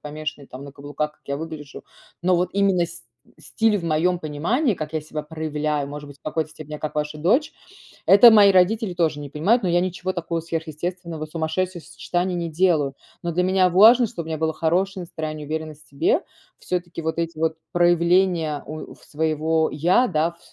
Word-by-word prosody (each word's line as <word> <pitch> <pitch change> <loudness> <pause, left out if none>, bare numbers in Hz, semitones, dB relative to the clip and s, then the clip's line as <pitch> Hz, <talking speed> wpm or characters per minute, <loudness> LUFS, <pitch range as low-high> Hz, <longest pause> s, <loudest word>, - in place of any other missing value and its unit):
помешанный 150 -1 -6
там 130 +2 -10
на 140 - -9
каблуках, 145 +2 -4
как - - -35
я 140 0 -2
выгляжу. 155 -2 -8 0.4
Но 180 0 +3
вот 180 +1 0
именно 195 -3 +2
с 170 -4 -12 0.4
стиль 220 -2 +1
в 180 - -4
моём 170 +3 +1
понимании, 185 - 0
как 155 -1 -6
я 155 - 0
себя 155 0 -5
проявляю, 150 -2 -3
может 145 0 -8
быть, 140 0 -13
в - - -60
какой-то 155 0 -2
степени, 155 -1 -8
как 155 - -5
ваша 150 0 -3
дочь, 255 - +2 0.6
это 215 +4 +9
мои 205 -2 +7
родители 190 +2 +2
тоже 160 -4 0
не 145 -1 -7
понимают. 195 - +2
Но 180 - +1
я 175 +1 +3
ничего 185 +1 -2
такого 170 -1 -3
сверхъестественного, 165 0 -5
сумасшедшего 170 +3 -2
сочетаний 180 +1 -2
не 170 -1 -3
делаю. 155 -5 +1 0.3
Но 170 - -1
для 180 +2 +1
меня 185 0 +3
важно, 225 +6 +7
чтобы 170 -4 -7
мне 160 - -2
было 160 0 0
хорошее 185 +4 0
настроение, 155 -2 -6
уверенность 155 -1 -6
себе. 385 +9 +1 0.4
Всё-таки 175 -2 -4
вот 160 +1 -2
эти 165 -1 -3
вот 160 0 0
проявления, 175 -2 +2
ой, 155 +1 -7
у - - -13
своего 160 +1 0
я, 180 - +3
да, 165 -1 0
в 170 - -24
165 Hz, 185 wpm, -23 LUFS, 155-180 Hz, 0.6 s, это